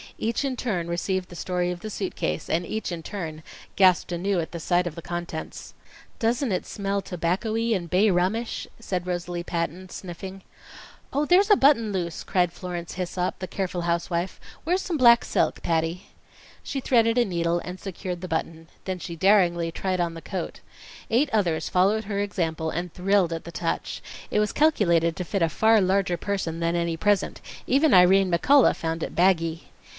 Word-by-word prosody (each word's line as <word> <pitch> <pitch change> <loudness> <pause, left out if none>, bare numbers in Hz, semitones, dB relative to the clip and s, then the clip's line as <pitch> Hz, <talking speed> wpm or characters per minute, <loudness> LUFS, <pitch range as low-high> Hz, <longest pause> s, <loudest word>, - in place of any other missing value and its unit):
Each 230 +5 -1
in 270 -2 -1
turn 190 -9 -2
received 180 +2 -2
the 175 - -10
story 180 0 -1
of 175 - -5
the 215 - -5
suit 195 -2 -4
case, 75 +1 -2
and 170 +2 0
each 220 +1 -3
in 170 -1 -4
turn 160 -4 -6 0.3
gasped 185 -2 +4
anew 185 +2 0
at 170 +1 -4
sight 175 +2 +1
of 160 - -5
the 170 - -7
contents. 175 -1 -6 0.5
"Doesn't 235 +1 +1
it 185 - -1
smell 200 0 -2
tobaccoey 215 +7 -1
and 175 -3 -4
bay 195 +5 +4
rummish?" 195 +6 0
said 185 -5 -3
Rosalie 175 -1 -3
Patton, 175 +2 -3
sniffing. 190 +2 -8 0.7
"Oh, 290 +2 +1
there's 370 +6 +4
a - - +9
button 265 - +4
loose!" 175 -4 -3
cried 180 -3 +1
Florence 175 -1 -6
Hissop, 180 0 -2
the 185 - -4
careful 185 -2 -3
housewife. 170 +1 -1 0.2
"Where's 360 +4 +1
some 345 -4 -2
black 235 -3 +7
silk, - - 0
Patty?" 165 +2 -1 0.6
She 275 - -3
threaded 230 -2 +3
a 240 - +4
needle 170 -2 0
and 180 +1 -7
secured 180 -2 -5
the 185 - -5
button. 165 0 -3 0.2
Then 185 -1 -2
she 170 -1 -6
daringly 170 -2 +3
tried 185 +1 -2
on 170 -1 0
the 165 - -8
coat. 185 -1 -5 0.5
Eight 265 +6 +3
others 180 -7 0
followed 200 +4 +2
her 200 -1 -2
example 165 -6 -1
and 175 +1 -4
thrilled 185 -2 +2
at 165 - -5
the 170 - -9
touch. 165 0 -3 0.3
It - - +1
was 210 -1 +1
calculated 170 - +3
to 180 - -3
fit 190 +1 -1
a 165 - +3
far 220 +5 +4
larger 190 -2 +1
person 180 -5 -3
than 170 0 0
any 170 -1 -1
present. 205 +2 +1 0.3
Even 285 +3 +4
Irene 185 +1 +6
McCullough 255 - +5
found 165 0 -3
it - - -5
baggy. 165 -3 +2
180 Hz, 180 wpm, -25 LUFS, 170-205 Hz, 0.7 s, a